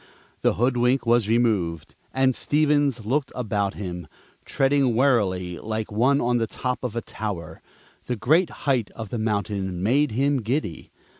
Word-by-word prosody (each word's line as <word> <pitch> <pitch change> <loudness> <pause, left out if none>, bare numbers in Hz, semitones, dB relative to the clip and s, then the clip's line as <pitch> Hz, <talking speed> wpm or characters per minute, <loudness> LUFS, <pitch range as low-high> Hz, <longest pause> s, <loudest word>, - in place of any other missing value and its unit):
The - - +2
hoodwink 125 +2 +2
was 115 -2 +3
removed, 100 -10 0 0.2
and 130 0 +2
Stevens 145 -6 +1
looked 135 +4 0
about 100 -5 -1
him, 90 -4 -6 0.4
treading 135 -3 +2
warily, 95 -9 +1
like 110 0 -4
one 130 +7 +3
on 120 -1 +1
the 115 - 0
top 125 +3 -3
of 120 -3 -3
a 115 - -1
tower; 100 -7 -6 0.5
the 125 - -1
great 155 - +3 0.2
height 130 -7 +1
of 110 -3 -6
the 120 - -3
mountain 100 -4 -2
made 135 +4 +2
him 135 +2 +1
giddy. 115 - -3
120 Hz, 150 wpm, -24 LUFS, 105-135 Hz, 0.5 s, was